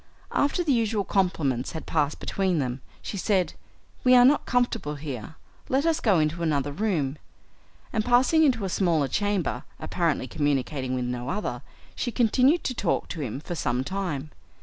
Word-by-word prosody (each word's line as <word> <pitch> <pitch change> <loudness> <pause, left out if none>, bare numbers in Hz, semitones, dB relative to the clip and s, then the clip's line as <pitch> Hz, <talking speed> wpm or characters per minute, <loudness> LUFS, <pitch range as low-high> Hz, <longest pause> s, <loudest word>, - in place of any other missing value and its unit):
After 290 +5 +1
the 295 -5 +2
usual 225 -3 +1
compliments 160 - 0
had 160 - -6
passed 150 -2 0
between 190 -3 0
them 130 -2 -2 0.2
she 200 - -5
said, 185 -3 +1 0.5
"We 255 0 +6
are 245 0 +8
not 285 +3 +4
comfortable 235 -11 0
here, 140 -1 -6 0.3
let 270 +4 +2
us 330 -1 +2
go 210 - +3
into 155 +2 0
another 145 -3 0
room," 155 -6 -1 0.7
and 220 -2 +1
passing 255 +7 +4
into 245 -9 +2
a - - -1
smaller 170 -6 +2
chamber, 195 -9 -1 0.2
apparently 165 -7 -1
communicating 135 -1 -1
with 125 -1 -1
no 125 +1 -3
other, 210 +6 -3 0.3
she 245 - -2
continued 255 +7 +3
to 255 - -1
talk 200 -7 -1
to 165 - -5
him 130 -1 -4
for 175 - -5
some 125 -6 -1
time. 155 -4 -3
175 Hz, 170 wpm, -26 LUFS, 145-230 Hz, 0.7 s, are